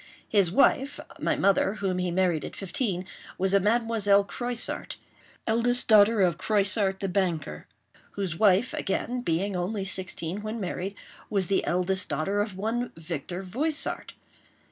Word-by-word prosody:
His 200 -5 +3
wife—my 275 +5 +1
mother, 200 +1 +2
whom 190 -3 -2
he 180 0 -1
married 175 -3 +1
at - - -7
fifteen—was 190 -1 -3
a 200 - +6
Mademoiselle 210 -1 +2
Croissart, 240 +3 -2 0.5
eldest 235 +2 +2
daughter 215 0 +6
of 175 -2 +1
Croissart 200 -2 +3
the 195 - -1
banker, 175 - -2 0.5
whose 190 -5 -3
wife, 205 +5 +3
again, 245 +5 -2
being 190 0 -1
only 190 +3 -2
sixteen 190 -1 -2
when 215 +2 -5
married, 190 0 -4 0.3
was 195 -4 0
the 195 - +2
eldest 185 +2 0
daughter 195 +6 0
of 205 -3 -4
one 230 +4 -2
Victor 165 +3 -5
Voissart. 285 - -2
195 Hz, 135 wpm, -27 LUFS, 180-220 Hz, 0.5 s, a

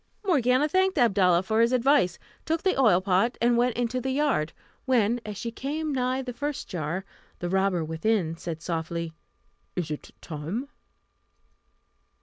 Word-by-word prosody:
Morgiana 270 - +3
thanked 375 +3 +2
Abdalla 190 -7 +4
for 220 +3 +2
his 230 +1 +4
advice, 255 - +3 0.3
took 325 0 -1
the 375 - +2
oil 220 -9 +4
pot, 195 +5 +2
and 240 0 +3
went 240 0 +2
into 245 +1 -1
the 265 - -2
yard; 265 - +1 0.3
when, 240 -2 +2
as 210 -2 -5
she 230 - -4
came 295 +5 -3
nigh 255 0 0
the 250 -1 -5
first 290 +3 -4
jar, 180 +1 -3 0.3
the 175 - -4
robber 190 -3 +1
within 165 +1 0
said 165 -1 -6
softly, 165 -1 -3 0.6
"Is 175 -4 -2
it 150 - -6
time?" 170 - -5
230 Hz, 150 wpm, -27 LUFS, 175-260 Hz, 0.6 s, Abdalla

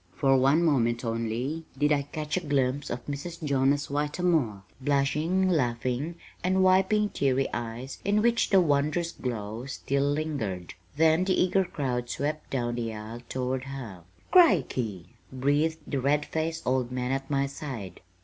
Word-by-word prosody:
For 135 -1 +3
one 135 +6 +4
moment 120 -5 +2
only 115 +7 -2
did 145 +2 +2
I 145 -1 +3
catch 150 +2 -4
a - - +2
glimpse 140 -3 0
of 120 +1 -5
Mrs. 160 +4 -6
Jonas 140 0 +2
Whitermore, 145 - 0 0.2
blushing, 150 +7 +1
laughing, 130 0 0 0.3
and 190 +1 +2
wiping 190 +3 +4
teary 135 -4 +1
eyes 120 +3 -5
in 210 +1 +2
which 235 0 +2
the 195 - +6
wondrous 155 +1 +1
glow 115 0 -5
still 140 0 -1
lingered; 110 - -3 0.2
then 160 +2 +4
the 185 - +2
eager 190 +1 +3
crowd 125 -7 -3
swept 150 +4 -3
down 120 -3 -1
the 115 -1 -2
aisle 110 +3 -7
toward 130 0 -2
her. 125 -10 -7 0.3
"Crickey!" 115 - +3 0.2
breathed 145 +5 +1
the 140 -3 -2
red 145 +3 +2
faced 160 +1 -3
old 125 -1 0
man 125 0 -2
at 135 0 -2
my 140 -1 +1
side. 130 - -7
140 Hz, 150 wpm, -28 LUFS, 125-160 Hz, 0.3 s, the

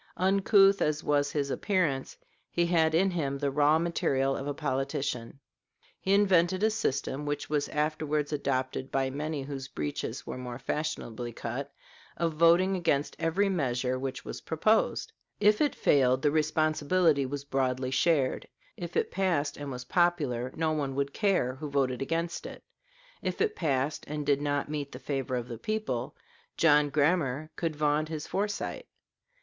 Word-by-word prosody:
Uncouth 195 +1 +4
as 150 0 0
was 145 -1 +1
his 140 -2 -1
appearance, 160 -10 0 0.3
he 170 - +1
had 160 -2 +3
in 190 +3 +3
him 140 -6 -1
the 140 0 -1
raw 150 +2 +4
material 135 -5 0
of 135 - -4
a 145 - -1
politician. 135 -3 -2 0.6
He 195 +1 +2
invented 185 -1 +3
a 220 - +4
system 140 -8 -1
which 145 0 -3
was 145 -1 0
afterwards 150 0 -1
adopted 130 -2 -2
by 135 -1 0
many 150 +1 -3
whose 135 -1 -6
breeches 75 - -4
were - - -6
more 125 -1 -6
fashionably 125 -4 -3
cut 130 +5 -5 0.5
of 165 -1 0
voting 170 +4 +4
against 160 -5 0
every 185 +5 +1
measure 130 -8 0
which 135 0 -5
was - - -6
proposed. 215 +8 +1 0.3
If 210 0 +4
it 295 -2 +2
failed, 130 -2 +3
the 145 - +4
responsibility 155 0 +2
was 140 +1 -4
broadly 130 -1 -1
shared; 140 -2 +1 0.3
if 175 -1 -5
it - - 0
passed 175 -6 0
and 145 -1 -6
was 125 -1 -6
popular, 145 -7 +1
no 160 -1 0
one 140 -4 -2
would 140 0 -1
care 190 - +1
who 150 +3 -6
voted 135 -3 0
against 165 +4 -2
it; - - -10 0.6
if - - -3
it 435 -1 +1
passed 140 -1 -1
and 150 0 -4
did 140 0 +2
not 145 -1 0
meet 145 -2 -4
the - - -6
favor 135 -1 -3
of 120 -1 -3
the 115 -3 -7
people, 215 - -3 0.4
John 150 -2 +5
Grammar 150 -1 +1
could 165 -2 -2
vaunt 150 +1 +1
his 155 -2 -4
foresight. 205 +1 -3
145 Hz, 160 wpm, -29 LUFS, 135-170 Hz, 0.6 s, John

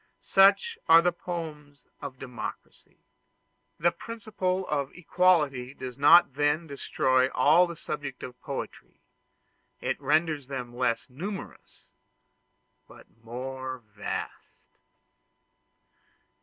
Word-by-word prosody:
Such 200 - +4
are 165 +1 +8
the 175 - +3
poems 155 -6 -7 0.2
of 135 -2 -7
democracy. 125 -3 -8 0.8
The 175 +2 +3
principle 190 -2 -3
of 140 -2 -1
equality 150 -8 +2
does 125 -1 -7
not 145 +2 +6
then 145 +3 +1
destroy 130 -3 +1
all 155 +8 +4
the 170 - -7
subjects 145 -4 -6
of 125 0 -9
poetry: 140 - -7 0.8
it - - -3
renders 155 -3 +1
them 125 -3 -6
less 120 -2 0
numerous, 185 +10 -8 1.0
but - - -15 0.2
more 130 +2 -5 0.2
vast. 100 - -7
145 Hz, 100 wpm, -28 LUFS, 130-175 Hz, 1.0 s, are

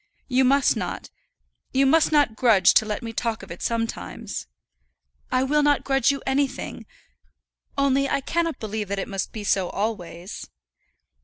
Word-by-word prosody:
You 260 0 +3
must 275 +2 +4
not, - - -5 0.6
you 270 +1 +4
must 320 +4 +4
not 290 -7 +3
grudge 210 -6 +5
to 220 - +4
let 210 +3 -3
me 230 -1 -5
talk 225 -3 -2
of 190 - -11
it 170 - -8
sometimes." 230 -1 -3 0.8
"I 255 - +2
will 295 +3 +2
not 290 -1 +3
grudge 270 -2 +2
you 280 -1 -1
anything; 270 +1 -2 0.9
only 275 0 +2
I - - +1
cannot 330 +3 -1
believe 215 -1 -4
that 200 +1 -3
it 195 - -3
must 195 -1 -3
be 215 - -6
so 190 -3 +1
always." 190 -4 -5
245 Hz, 160 wpm, -24 LUFS, 210-275 Hz, 0.9 s, grudge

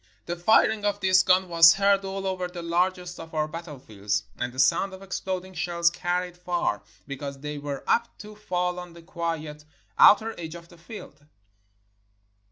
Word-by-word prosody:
The 175 - -3
firing 220 +4 +3
of 205 0 0
this 185 -1 +4
gun 185 0 +3
was 165 -1 +7
heard 200 0 +3
all 195 0 -5
over 185 -1 -2
the 180 -1 -8
largest 180 +1 -1
of 165 0 -10
our 155 0 0
battlefields, 135 - -4 0.2
and 125 - -2
the 130 - -15
sound 140 +9 +2
of 190 - -13
exploding 190 -1 -4
shells 170 -1 +1
carried 180 0 -2
far, 175 -11 -2 0.2
because 140 0 -6
they 150 0 -5
were 145 -1 -5
apt 235 0 0
to 210 0 -11
fall 180 -3 -2
on 180 -1 -10
the 170 0 -14
quiet, 165 -3 -5 0.4
outer 220 +2 +6
edge 165 -1 -7
of 170 0 -12
the 175 - -17
field. 175 -4 -11
175 Hz, 175 wpm, -26 LUFS, 165-190 Hz, 0.4 s, was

